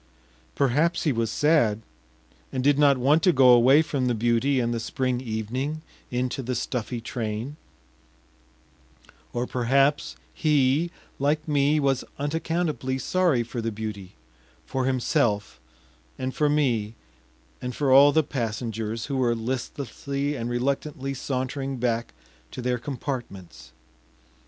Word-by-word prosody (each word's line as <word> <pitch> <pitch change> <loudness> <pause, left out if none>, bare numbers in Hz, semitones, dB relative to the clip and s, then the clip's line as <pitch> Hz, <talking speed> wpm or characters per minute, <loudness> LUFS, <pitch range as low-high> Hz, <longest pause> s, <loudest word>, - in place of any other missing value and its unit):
Perhaps 150 +6 +2
he 155 - +2
was 115 -3 -1
sad, 115 -6 +2 0.7
and 130 -1 -2
did 145 +1 +3
not 140 -2 +5
want 145 +6 +3
to 180 - +5
go 135 -5 +5
away 130 +5 +7
from 135 -5 -1
the 120 - +1
beauty 120 +4 +2
and 120 -1 0
the 115 - -2
spring 125 +2 -2
evening 130 +7 -3 0.3
into 125 +2 -2
the 125 0 -3
stuffy 125 -1 -3
train; 115 +3 -4 1.8
or 120 +1 -2
perhaps 135 - +1 0.2
he, 150 +2 +2 0.3
like 150 +3 0
me, 145 0 +2
was 135 -2 +1
unaccountably 155 -2 -1
sorry 160 -2 +1
for 120 +1 -5
the 115 0 -2
beauty, 105 -3 -6 0.5
for 130 - -2
himself, 115 -5 0 0.6
and 130 0 -3
for 150 -2 +1
me, 120 -8 +1 0.7
and 125 -1 -4
for 140 -3 +1
all 140 +2 +8
the 160 +1 +3
passengers, 115 -3 -3
who 140 -1 -3
were 120 -2 +2
listlessly 140 +4 -3
and 115 -2 -3
reluctantly 135 +2 -2
sauntering 135 +1 -3
back 115 -1 -1 0.4
to - - -9
their 125 0 -1
compartments. 120 - -6
130 Hz, 130 wpm, -25 LUFS, 115-145 Hz, 1.8 s, all